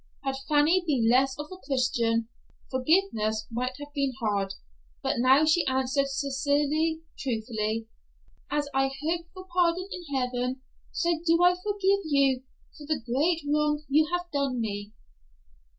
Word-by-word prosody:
Had 270 -1 -1
Fanny 310 +5 +4
been 255 -7 +2
less 260 +3 +3
of 295 - -4
a 370 - -7
Christian, 240 -7 0 0.4
forgiveness 255 - +1
might 250 +2 -2
have 290 0 -10
been 275 -3 0
hard, 200 -4 -1 0.5
but - - 0
now 265 +5 +5
she 315 +2 +4
answered 265 +1 +1
sincerely, 290 +3 0 0.2
truthfully, 225 -4 -2 0.6
"As 295 -1 0
I 270 0 +3 0.2
hope 335 +2 -1
for 370 -1 -10
pardon 355 +1 +2
in 355 -1 -6
heaven, 250 0 -1 0.3
so 345 0 0
do 335 +1 +3
I 355 0 +7
forgive 395 +1 +1
you 275 -4 +2 0.3
for 295 -2 -11
the 305 -2 0
great 285 +8 0
wrong 300 0 +1
you 310 +3 +4
have 355 0 -1
done 275 -3 0
me." 205 -2 -3
280 Hz, 145 wpm, -27 LUFS, 250-320 Hz, 0.6 s, I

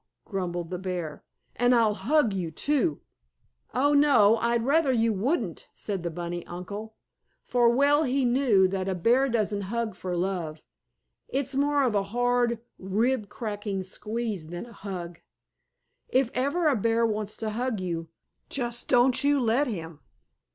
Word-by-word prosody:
grumbled 175 -4 -3
the 180 -1 -4
bear. 175 -5 -4 0.3
"And 245 +1 +4
I'll 225 -3 +4
hug 245 0 +2
you, 180 -4 -2
too!" 200 - 0 0.7
"Oh, 285 +3 +2
no! 240 -7 +5
I'd 235 0 0
rather 290 0 +3
you 230 -2 +2
wouldn't!" 255 - -2
said 200 -4 -4
the 170 - -2
bunny 175 +1 -5
uncle. 205 +5 -7 0.5
For 240 -1 +3
well 285 +5 +4
he 270 -2 +1
knew 240 -6 +4
that 190 0 -2
a 190 - -1
bear 245 +9 +3
doesn't 215 -3 0
hug 235 -1 -2
for 180 -1 -4
love. 170 -4 -3 0.6
It's 275 +1 -1
more 285 +1 +2
of 245 -4 +1
a 200 - +2
hard, 245 +1 +1 0.2
rib 215 +3 0
cracking 205 -4 -4
squeeze 210 -2 -4
than 175 +5 -6
a 235 - -14
hug. 180 -4 -7 0.9
If 260 -2 +2
ever 285 +7 +1
a 290 - +4
bear 230 +1 +2
wants 215 -1 -2
to 220 -1 -3
hug 240 0 -2
you, 165 -3 -4 0.4
just 240 -2 -2
don't 250 +1 +4
you 285 0 +3
let 250 +4 +2
him. 165 -8 -6
225 Hz, 155 wpm, -27 LUFS, 190-255 Hz, 0.9 s, no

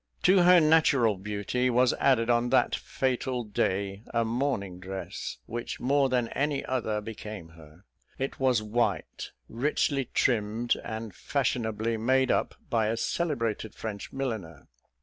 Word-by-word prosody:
To 185 0 +6
her 180 0 +7
natural 155 -8 +4
beauty 105 +6 -1
was 125 0 +3
added 120 -4 +3
on 120 0 +2
that - - +3
fatal 130 -1 -2
day 100 -1 -1
a 115 -1 +1
morning 110 -7 -2
dress, 95 +1 -6
which 120 +1 -5
more 135 +1 +2
than 125 -2 +1
any 145 0 -1
other 110 -5 -1
became 105 -5 -8
her; 80 +2 -17 0.3
it 135 +1 -4
was 130 -5 +2
white, 115 +3 -1 0.2
richly 135 +2 0
trimmed, 115 0 +1
and 110 -2 -5
fashionably 115 -3 -1
made 130 +3 +2
up - - 0
by 110 -2 +1
a 115 +1 -1
celebrated 115 - -2
French 105 -3 -6
milliner. 110 - -5
115 Hz, 135 wpm, -28 LUFS, 105-130 Hz, 0.3 s, her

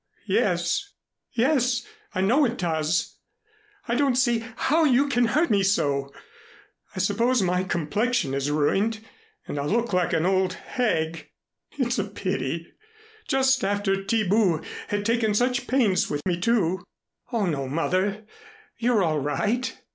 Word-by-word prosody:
"Yes, 400 0 0 0.4
yes; 250 -1 +1 0.3
I 185 - +1
know 240 +10 +3
it 240 -2 0
does. 160 -1 -1 0.7
I 235 - 0
don't 270 0 +2
see 240 -3 +2
how 320 +6 +2
you 280 -1 +4
can 245 -3 +2
hurt 295 +7 +1
me 200 -2 +3
so. 140 -8 +1 0.8
I - - -10
suppose 220 +5 +2
my 180 0 +1
complexion 185 - -1
is 140 +1 -1
ruined 195 +10 +1 0.5
and 145 - -4
I'll 145 +1 -2
look 235 -1 0
like 180 -1 +1
an 165 0 +1
old 185 0 +2
hag. 165 -10 -2 0.5
It's 240 -5 0
a - - +1
pity! 185 -6 -4 0.5
Just 265 -1 +2
after 200 0 +1
Thiebout 195 -3 +1 0.2
had 205 0 -2
taken 230 -2 +1
such 245 +2 +1
pains 235 -8 +2
with 145 0 -3
me, 175 -2 0
too." 185 -4 +1 0.5
"Oh, 225 -5 +1
no, 140 -6 -2
Mother, 185 +7 -1 0.5
you're 235 -4 +2
all 155 -3 +1
right. 210 - -1
205 Hz, 140 wpm, -25 LUFS, 170-240 Hz, 0.8 s, you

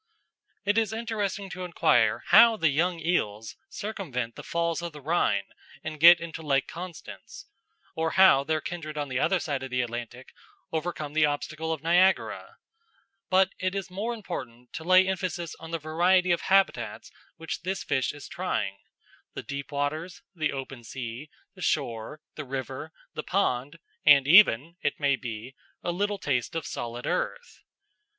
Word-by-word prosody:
It 205 +2 +3
is 220 -1 -1
interesting 220 -3 -3
to 185 0 -6
inquire 180 -1 +2
how 230 -1 +8
the 165 -6 +3
young 170 +4 +1
eels 110 -11 -1
circumvent 140 - -4
the - - -8
Falls 170 0 -1
of 170 -2 -5
the 150 - -9
Rhine 140 -10 +1 0.4
and 155 -1 -6
get 170 +2 +9
into 165 -1 -7
Lake 140 -3 +1
Constance, 175 0 -9 0.5
or 160 0 0
how 190 -8 +7
their 155 +2 -1
kindred 155 -3 -6
on 145 -1 -3
the 130 0 -1
other 190 +5 +2
side 140 -6 -3
of 135 - -6
the 125 0 0
Atlantic 120 +1 -7 0.4
overcome 155 -2 -3
the 155 -1 +4
obstacle 155 +2 -3
of 160 -2 -3
Niagara; 180 +3 +2 0.7
but 190 0 +3
it 185 +1 -1
is 195 -2 -4
more 220 +6 -3
important 125 - -8
to 160 - -6
lay 185 +2 +5
emphasis 180 -3 -3
on 165 - -9
the 165 - -2
variety 175 +4 +2
of 170 - +2
habitats 155 - +1 0.3
which 160 0 -5
this 185 +2 -3
fish 130 -2 0
is 145 - -10
trying 100 - -3 0.6
the - - -5
deep 140 0 -6
waters, 150 +5 -3
the 155 -4 -1
open 135 -2 -7
sea, 120 +4 -7 0.2
the - - -14
shore, 115 +6 -2
the 150 - -6
river, 135 +3 -5 0.2
the - - -4
pond, 145 -6 -1 0.3
and 140 -2 +7
even, 170 - +6
it 145 - -1
may 140 -2 +3
be, 120 0 -7 0.3
a 175 - -1
little 205 +3 -1
taste 135 -6 -1
of 165 - -2
solid 120 +1 -5
earth. 485 -1 -3
160 Hz, 165 wpm, -27 LUFS, 135-180 Hz, 0.7 s, get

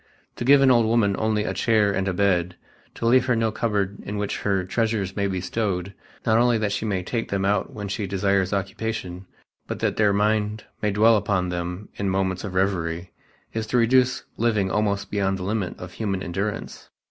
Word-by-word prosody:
To - - -3
give 140 +2 +6
an 130 - +6
old 120 -3 +4
woman 110 -3 +2
only 110 -1 +1
a - - -2
chair 110 -3 +2
and 95 -1 -1
a 95 - 0
bed, 90 -3 +1 0.4
to - - -4
leave 130 +2 +4
her 125 - +3
no 115 -1 +1
cupboard 100 -3 -1
in 105 - -5
which 105 -1 -2
her 100 -2 0
treasures 105 -1 -1
may 100 -1 0
be 95 -1 -2
stowed, 95 -1 -2 0.3
not 110 0 +4
only 120 -1 +4
that 105 -2 -1
she 105 +2 -2
may 95 -3 -1
take 115 +5 -3
them 95 -1 -1
out 100 -1 +1
when 105 -1 -6
she 100 +1 -3
desires 100 -1 +1
occupation, 100 -2 -3 0.4
but - - -4
that - - -1
their 105 -2 +4
mind 105 +1 +1 0.2
may 105 - +1
dwell 110 +2 +5
upon 100 -3 0
them 90 +3 -4
in 100 -1 -1
moments 95 -1 -1
of 95 -3 -5
revery, 90 -2 -1 0.4
is 110 -1 -3
to 125 - +1
reduce 125 +2 +3
living 110 -5 +1
almost 100 -1 0
beyond 95 -2 0
the 90 - -6
limit 100 -1 -2
of 90 -1 -8
human 95 -2 -3
endurance. 95 +4 -4
100 Hz, 205 wpm, -24 LUFS, 95-110 Hz, 0.4 s, give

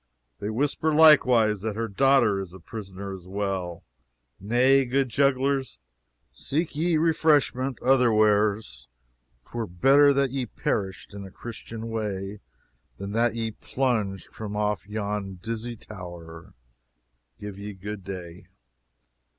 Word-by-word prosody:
They 105 - -3
whisper 145 +7 0
likewise 125 -9 +6
that 110 -1 -3
her 115 +1 -2
daughter 115 -2 +3
is 95 -2 -7
a - - -11
prisoner 100 0 -7
as 90 -2 -10
well. 95 -3 -3 0.6
Nay, 125 +7 +4
good 130 +1 0
jugglers, 135 - +1 0.6
seek 150 - -2
ye 165 +2 +2
refreshment 150 -5 +2
other 125 -2 +4
wheres. 105 - +2 0.6
'Twere 115 -2 -4
better 135 +12 +5
that 140 -2 +1
ye 130 -2 -2
perished 95 -1 -3
in 100 -1 -7
a 95 - -9
Christian 115 +2 -8
way 105 -2 -3 0.6
than 100 +1 -6
that 115 +1 +1
ye 115 -1 -2
plunged 110 -6 -2
from 105 -1 -6
off 105 -1 -1
yon 105 -2 -3
dizzy 115 +5 -5
tower. 85 - -10 0.8
Give 105 -1 -7
ye 105 +1 -6
good 100 +1 -7
day." 90 -2 -8
110 Hz, 125 wpm, -26 LUFS, 100-130 Hz, 0.8 s, likewise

